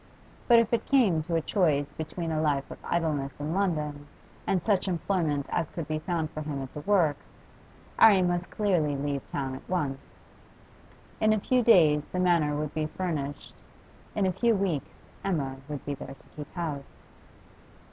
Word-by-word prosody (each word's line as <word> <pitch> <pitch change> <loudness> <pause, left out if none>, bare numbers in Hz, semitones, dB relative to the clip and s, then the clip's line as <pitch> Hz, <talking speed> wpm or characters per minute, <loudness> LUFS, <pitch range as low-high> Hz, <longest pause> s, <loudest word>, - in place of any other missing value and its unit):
But 235 - +7
if 230 0 +3
it 230 - +2
came 220 - +4
to 170 - -1
a 165 - +2
choice 150 -6 +1
between 160 +1 -4
a 155 -1 0
life 145 -3 0
of - - -8
idleness 150 -5 -1
in 150 +2 -2
London 150 -7 -1 0.4
and 185 -3 +1
such 200 -3 +1
employment 165 -5 0
as 160 - -1
could 165 -4 -5
be 155 0 -1
found 160 -2 -2
for 155 - -5
him 150 -2 -4
at 130 - -9
the - - -5
works, 165 -3 0 0.5
'Arry 200 -4 +7
must 175 0 0
clearly 175 -9 +1
leave 140 0 -3
town 135 -2 -3
at 130 - -10
once. 145 -7 -3 1.0
In 215 0 +4
a 215 - +1
few 250 +5 +2
days 160 -10 +6
the 180 - -2
Manor 170 -5 +3
would 150 0 -3
be 155 -1 -1
furnished; 155 -5 -4 0.6
in 205 - +2
a 185 - +2
few 235 +4 +2
weeks 190 -8 -1 0.3
Emma 140 -9 -1
would 145 -2 -5
be 145 - -2
there 135 0 -8
to - - -23
keep 150 -1 -8
house. 150 -6 -4
160 Hz, 175 wpm, -28 LUFS, 145-185 Hz, 1.0 s, But